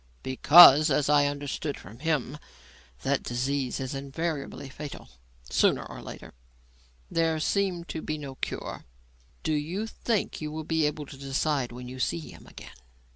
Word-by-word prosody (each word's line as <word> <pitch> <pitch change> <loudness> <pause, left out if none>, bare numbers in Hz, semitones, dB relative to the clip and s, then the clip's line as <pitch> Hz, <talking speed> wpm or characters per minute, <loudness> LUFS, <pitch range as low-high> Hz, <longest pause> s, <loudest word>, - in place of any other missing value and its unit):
"Because 150 +3 +8
as 145 0 +1
I 145 -1 +5
understood 145 +1 -4
from 105 +6 -13
him 150 -2 -1 0.6
that - - +1
disease 130 +2 -2
is 130 0 -4
invariably 140 +1 -4
fatal, 145 - -9 0.4
sooner - - +2
or - - -9
later. - - -10 0.8
There 165 -1 +1
seem 185 +1 0
to 160 -2 -6
be 155 - -3
no 140 -3 -7
cure. - - -5 0.6
Do 155 - 0
you 165 +8 -2
think 225 -4 -2
you 150 -1 -4
will 155 +1 -5
be 160 -1 +1
able 150 0 -4
to 140 - -11
decide 135 -1 -1
when 125 +1 -8
you 130 +1 -8
see 85 -8 0
him - - -15
again?" - - -12
145 Hz, 155 wpm, -27 LUFS, 135-160 Hz, 0.8 s, Because